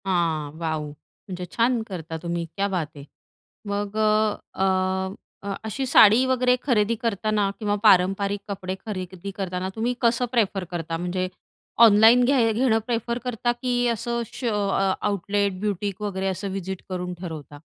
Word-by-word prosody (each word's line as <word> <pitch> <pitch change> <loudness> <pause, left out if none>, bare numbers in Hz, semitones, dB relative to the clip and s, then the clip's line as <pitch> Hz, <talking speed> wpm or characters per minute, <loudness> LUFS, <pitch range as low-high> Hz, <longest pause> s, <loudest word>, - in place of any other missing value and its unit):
हां 165 -5 0
वाव! 160 -2 -2
म्हणजे 180 +5 -10
छान 235 0 +2
करता 165 -4 -6
तुम्ही. 170 0 -2
क्या 200 0 0
बात 170 -6 -3
है. 140 - -9 0.6
मग 205 +1 -3
अ, 215 -1 +2 0.2
अ, 190 - 0 0.8
अ, 200 0 -3
अशी 220 +5 -2
साडी 230 0 +6
वगैरे 255 -1 +3
खरेदी 230 -4 +2
करताना 215 -2 0
किंवा 205 -2 0
पारंपरिक 195 +1 +4
कपडे 190 -2 -4
खरेदी 190 -2 -5
करताना 185 -1 -3
तुम्ही 235 +3 0
कसं 235 +1 +2
प्रेफर 205 -6 +1
करता 165 -1 -3
म्हणजे 180 +2 -2 0.6
ऑनलाईन 225 +3 +7
घ्या 245 -4 +3
घेणं 225 0 +2
प्रेफर 235 -1 -1
करता 240 -1 -1
की 245 -1 +1
असं 235 +1 -1
शो 250 - -4 0.2
अ, 195 0 +2
आउटलेट, 200 -1 0
ब्युटीक 200 -1 -2
वगैरे 195 -2 -2
असं 190 +1 -3
व्हिजिट 190 -1 -5
करून 180 -1 -3
ठरवता? 150 -4 -8
200 Hz, 150 wpm, -24 LUFS, 185-225 Hz, 0.8 s, ऑनलाईन